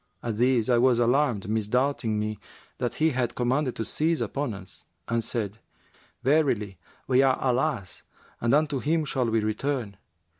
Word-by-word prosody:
At 115 Hz, -2 st, -3 dB
this 125 Hz, -2 st, +3 dB
I 120 Hz, -2 st, +4 dB
was 125 Hz, -1 st, +4 dB
alarmed, 120 Hz, -4 st, +2 dB
misdoubting 110 Hz, +2 st, 0 dB
me 105 Hz, -1 st, -3 dB, 0.4 s
that 120 Hz, -, -2 dB
he 160 Hz, +1 st, +2 dB
had 125 Hz, -3 st, -1 dB
commanded 125 Hz, +2 st, 0 dB
to 110 Hz, -, -3 dB
seize 160 Hz, +1 st, 0 dB
upon 140 Hz, -6 st, -2 dB
us, 95 Hz, -1 st, -12 dB, 0.2 s
and 115 Hz, 0 st, 0 dB
said, 110 Hz, -2 st, -3 dB, 0.6 s
'Verily 120 Hz, -, +1 dB, 0.3 s
we 130 Hz, 0 st, +4 dB
are 135 Hz, -1 st, +4 dB
Allah's 125 Hz, -, -1 dB, 0.4 s
and 115 Hz, -, +1 dB
unto 150 Hz, -2 st, +1 dB
Him 155 Hz, +3 st, 0 dB
shall 130 Hz, -4 st, 0 dB
we 115 Hz, 0 st, +2 dB
return! 110 Hz, -1 st, -2 dB
125 Hz, 155 wpm, -26 LUFS, 110-140 Hz, 0.6 s, I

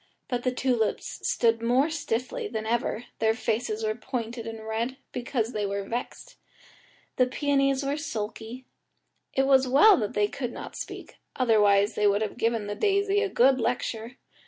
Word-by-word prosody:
But 245 Hz, -2 st, -1 dB
the 255 Hz, -, 0 dB
tulips 250 Hz, -3 st, -1 dB
stood 230 Hz, -1 st, +2 dB
more 255 Hz, +7 st, +2 dB
stiffly 310 Hz, -, -2 dB
than 220 Hz, -, -4 dB
ever, 235 Hz, 0 st, -1 dB
their 220 Hz, 0 st, +2 dB
faces 225 Hz, -1 st, -2 dB
were 215 Hz, 0 st, +1 dB
pointed 235 Hz, -1 st, -5 dB
and 225 Hz, -1 st, -7 dB
red, 230 Hz, +4 st, -2 dB
because 245 Hz, -2 st, -2 dB
they 210 Hz, -, -1 dB
were 200 Hz, 0 st, -2 dB
vexed. 235 Hz, +5 st, -6 dB, 0.8 s
The 255 Hz, -, +4 dB
peonies 275 Hz, 0 st, +1 dB
were 280 Hz, +2 st, -1 dB
sulky; 230 Hz, -2 st, -5 dB, 0.7 s
it 270 Hz, -, +2 dB
was 265 Hz, -1 st, +4 dB
well 295 Hz, +11 st, +7 dB
that 210 Hz, -4 st, -3 dB
they 210 Hz, 0 st, +3 dB
could 245 Hz, +1 st, -5 dB
not -, -, -8 dB
speak, -, -, -8 dB, 0.2 s
otherwise 210 Hz, -4 st, +4 dB
they 210 Hz, 0 st, +2 dB
would 205 Hz, +1 st, +2 dB
have 215 Hz, -, -5 dB
given 230 Hz, -2 st, 0 dB
the 205 Hz, -, -3 dB
daisy 400 Hz, -, +2 dB
a 420 Hz, -, 0 dB
good 265 Hz, -4 st, +4 dB
lecture. 240 Hz, 0 st, -2 dB
240 Hz, 165 wpm, -27 LUFS, 220-265 Hz, 0.8 s, well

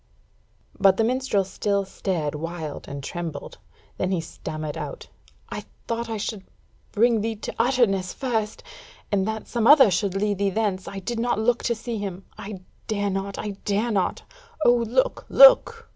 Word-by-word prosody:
But 195 Hz, -1 st, +5 dB
the 225 Hz, -, +3 dB
minstrel 250 Hz, -4 st, +1 dB
still 200 Hz, +1 st, -1 dB
stared 170 Hz, -6 st, -2 dB
wild 160 Hz, 0 st, -5 dB
and 140 Hz, 0 st, -6 dB
trembled; 165 Hz, -2 st, -6 dB, 0.4 s
then 185 Hz, -, -1 dB
he 185 Hz, -2 st, 0 dB
stammered 155 Hz, -2 st, -6 dB
out: -, -, -6 dB, 0.4 s
"I -, -, -6 dB, 0.2 s
thought 230 Hz, 0 st, -2 dB
I 225 Hz, -, -2 dB
should 210 Hz, -1 st, -4 dB, 0.5 s
bring 230 Hz, 0 st, +3 dB
thee 225 Hz, +1 st, -2 dB
to 210 Hz, -, -6 dB
Utterness 225 Hz, -7 st, +2 dB
first, 225 Hz, -5 st, -2 dB, 0.5 s
and 200 Hz, -1 st, +1 dB
that 220 Hz, 0 st, -4 dB
some 235 Hz, -2 st, 0 dB
other 275 Hz, -7 st, +8 dB
should 190 Hz, +2 st, 0 dB
lead 205 Hz, 0 st, 0 dB
thee 200 Hz, -1 st, +2 dB
thence, 195 Hz, -2 st, -1 dB
I 200 Hz, -, -6 dB
did 230 Hz, +4 st, -4 dB
not 240 Hz, -1 st, +1 dB
look 235 Hz, +2 st, +1 dB
to 235 Hz, -, +1 dB
see 230 Hz, 0 st, -5 dB
him. 195 Hz, -2 st, -5 dB
I 200 Hz, -2 st, -8 dB, 0.3 s
dare 205 Hz, -2 st, -1 dB
not, 195 Hz, +1 st, -3 dB
I 210 Hz, -, -3 dB
dare 210 Hz, +4 st, 0 dB
not! 195 Hz, -4 st, 0 dB, 0.4 s
O 240 Hz, -, +7 dB
look, 240 Hz, +2 st, 0 dB
look!" -, -, +7 dB
205 Hz, 170 wpm, -24 LUFS, 190-230 Hz, 0.5 s, other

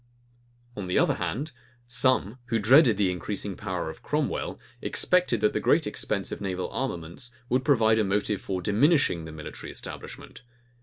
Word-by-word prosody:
On 100 Hz, -3 st, -5 dB
the 90 Hz, -, 0 dB
other -, -, +4 dB
hand, 145 Hz, +7 st, -3 dB, 0.4 s
some, 120 Hz, -1 st, +1 dB
who 120 Hz, -2 st, 0 dB
dreaded 120 Hz, +1 st, +6 dB
the 100 Hz, -3 st, +2 dB
increasing 95 Hz, +2 st, -3 dB
power 95 Hz, -6 st, -4 dB
of 80 Hz, -, -8 dB
Cromwell, -, -, -2 dB, 0.2 s
expected 180 Hz, -, +2 dB
that 105 Hz, -, +3 dB
the -, -, 0 dB
great -, -, +3 dB
expense -, -, -1 dB
of -, -, -5 dB
naval 95 Hz, -2 st, -3 dB
armaments 105 Hz, -, -3 dB, 0.2 s
would 130 Hz, +1 st, +2 dB
prove 140 Hz, -5 st, +3 dB
a 110 Hz, 0 st, +4 dB
motive 105 Hz, 0 st, 0 dB
for 95 Hz, -2 st, -3 dB
diminishing 105 Hz, -, +3 dB
the 80 Hz, -, -8 dB
military 75 Hz, -1 st, -8 dB
establishment. -, -, -8 dB
105 Hz, 160 wpm, -27 LUFS, 95-125 Hz, 0.4 s, dreaded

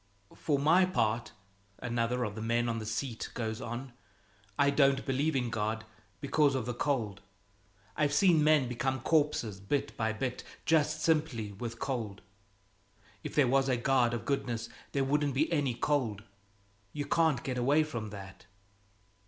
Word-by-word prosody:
"For 145 Hz, -3 st, 0 dB
my 160 Hz, +6 st, +5 dB
part," 115 Hz, -, 0 dB, 0.5 s
another 120 Hz, 0 st, -1 dB
of 105 Hz, -3 st, -3 dB
the 110 Hz, -, -6 dB
men 120 Hz, +1 st, +1 dB
on 115 Hz, -1 st, -1 dB
the 110 Hz, -, -6 dB
seat 115 Hz, +1 st, -3 dB
goes 110 Hz, -2 st, -3 dB
on, 120 Hz, +2 st, -6 dB, 0.6 s
"I 140 Hz, 0 st, +4 dB
don't 140 Hz, -1 st, +3 dB
believe 140 Hz, +3 st, 0 dB
in 125 Hz, -3 st, 0 dB
God 110 Hz, 0 st, -2 dB, 0.4 s
because 145 Hz, -1 st, +2 dB
of 130 Hz, -4 st, -1 dB
the 125 Hz, -, -2 dB
cold. 120 Hz, -6 st, -1 dB, 0.7 s
I've 145 Hz, -2 st, +1 dB
seen 160 Hz, +1 st, +4 dB
men 150 Hz, -4 st, +4 dB
become 130 Hz, +1 st, -2 dB
corpses 145 Hz, -10 st, +1 dB
bit 105 Hz, +9 st, -2 dB
by 110 Hz, -1 st, 0 dB
bit, 125 Hz, +3 st, -3 dB, 0.2 s
just 155 Hz, -1 st, +2 dB
simply 150 Hz, -10 st, +1 dB
with 115 Hz, +3 st, -6 dB
cold. 115 Hz, -7 st, -4 dB, 1.0 s
If -, -, -6 dB
there 145 Hz, -3 st, +5 dB
was 135 Hz, +1 st, +3 dB
a 125 Hz, -, +2 dB
God 120 Hz, -1 st, +2 dB
of 115 Hz, -, -5 dB
goodness, 120 Hz, -5 st, -2 dB, 0.2 s
there 140 Hz, -, +1 dB
wouldn't 145 Hz, 0 st, +1 dB
be 155 Hz, +5 st, +1 dB
any 140 Hz, -6 st, +1 dB
cold. 120 Hz, -6 st, 0 dB, 0.7 s
You 145 Hz, -1 st, -3 dB
can't 155 Hz, -4 st, +2 dB
get 125 Hz, -2 st, -2 dB
away 145 Hz, +5 st, +4 dB
from 120 Hz, -9 st, -5 dB
that." 100 Hz, -1 st, -10 dB
130 Hz, 160 wpm, -31 LUFS, 115-145 Hz, 1.0 s, my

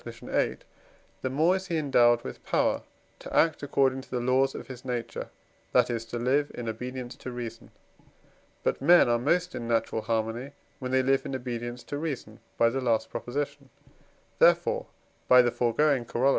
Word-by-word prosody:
viii.), -, -, -2 dB, 0.6 s
the 130 Hz, -, -1 dB
more 160 Hz, +7 st, +3 dB
is 190 Hz, 0 st, -8 dB
he 170 Hz, -3 st, -1 dB
endowed 120 Hz, -5 st, +4 dB
with -, -, -8 dB
power -, -, +1 dB, 0.4 s
to -, -, -9 dB
act 160 Hz, -2 st, +3 dB
according 135 Hz, -2 st, +1 dB
to -, -, -17 dB
the 125 Hz, -, -2 dB
laws 130 Hz, +2 st, +2 dB
of -, -, -7 dB
his 125 Hz, -2 st, -10 dB
own 125 Hz, -, -2 dB
nature, 120 Hz, -, -5 dB, 0.4 s
that -, -, +4 dB
is 115 Hz, -1 st, -3 dB
to 115 Hz, +1 st, -5 dB
live 135 Hz, +5 st, +1 dB
in 120 Hz, -, -5 dB
obedience 125 Hz, +2 st, -5 dB
to 130 Hz, -, -8 dB
reason. 115 Hz, -2 st, -7 dB, 0.9 s
But -, -, 0 dB
men 170 Hz, +2 st, +6 dB
are 120 Hz, 0 st, +2 dB
most 175 Hz, +7 st, +1 dB
in 120 Hz, -, -5 dB
natural 115 Hz, -1 st, 0 dB
harmony, 115 Hz, +5 st, -2 dB, 0.3 s
when 130 Hz, -, -4 dB
they 130 Hz, 0 st, +3 dB
live 135 Hz, +1 st, +2 dB
in 135 Hz, -, -3 dB
obedience 120 Hz, -1 st, -5 dB
to 145 Hz, -, -5 dB
reason 135 Hz, -9 st, -5 dB, 0.2 s
(by 115 Hz, 0 st, +4 dB
the 135 Hz, +2 st, -2 dB
last 115 Hz, -3 st, 0 dB
Prop.); -, -, -6 dB, 1.1 s
therefore -, -, +4 dB, 0.4 s
(by 125 Hz, 0 st, +8 dB
the 120 Hz, -, +1 dB
foregoing 125 Hz, +2 st, +2 dB
Coroll.) 125 Hz, +4 st, +1 dB
125 Hz, 180 wpm, -28 LUFS, 120-135 Hz, 1.1 s, by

